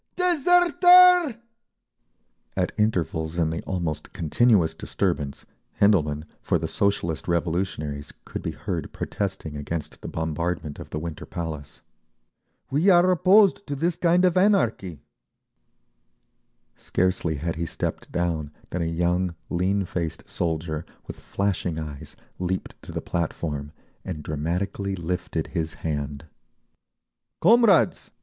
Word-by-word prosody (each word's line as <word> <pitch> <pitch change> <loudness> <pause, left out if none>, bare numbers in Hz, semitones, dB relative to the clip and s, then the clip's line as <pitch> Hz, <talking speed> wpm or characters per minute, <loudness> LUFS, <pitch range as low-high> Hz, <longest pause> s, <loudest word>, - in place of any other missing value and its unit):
"Deserter!" 355 - +6 1.2
At - - +1
intervals 85 -6 0
in 80 -2 +1
the 80 - -3
almost 85 -5 -3
continuous 85 0 +3
disturbance 80 -4 -2 0.3
Hendelman, 75 -7 +3 0.2
for - - +1
the 80 0 -3
Socialist 85 -2 -1
Revolutionaries, 85 -4 -2
could - - -6
be - - -3
heard - - -4
protesting 95 -7 -3
against 75 +2 -5
the - - -7
bombardment 80 -1 -3
of - - -9
the - - -4
Winter 80 -1 -6
Palace…. 80 -4 -6 0.9
"We 155 +8 +3
are 180 0 +6
opposed 195 +3 +4
to 145 - -2
this 165 +4 0
kind 175 +1 +3
of 180 -1 +2
anarchy…." 120 - +2 1.7
Scarcely 90 -3 0
had 80 +3 -3
he 85 0 -2
stepped - - -4
down 85 -4 -1 0.2
than 90 - -2
a - - 0
young, 85 +2 0 0.2
lean 95 +3 +1
faced 85 -2 -4
soldier, 80 -2 -2 0.2
with - - -9
flashing 95 -4 -2
eyes, 75 -3 -7 0.2
leaped 95 +1 -2
to - - -10
the - - -3
platform, 75 -4 -3 0.3
and 80 -5 -5
dramatically 90 +6 -2
lifted 90 -2 -3
his 80 -3 -2
hand: 75 -1 -3 1.1
"Comrades!" 225 -6 +4
85 Hz, 120 wpm, -25 LUFS, 80-110 Hz, 1.7 s, Deserter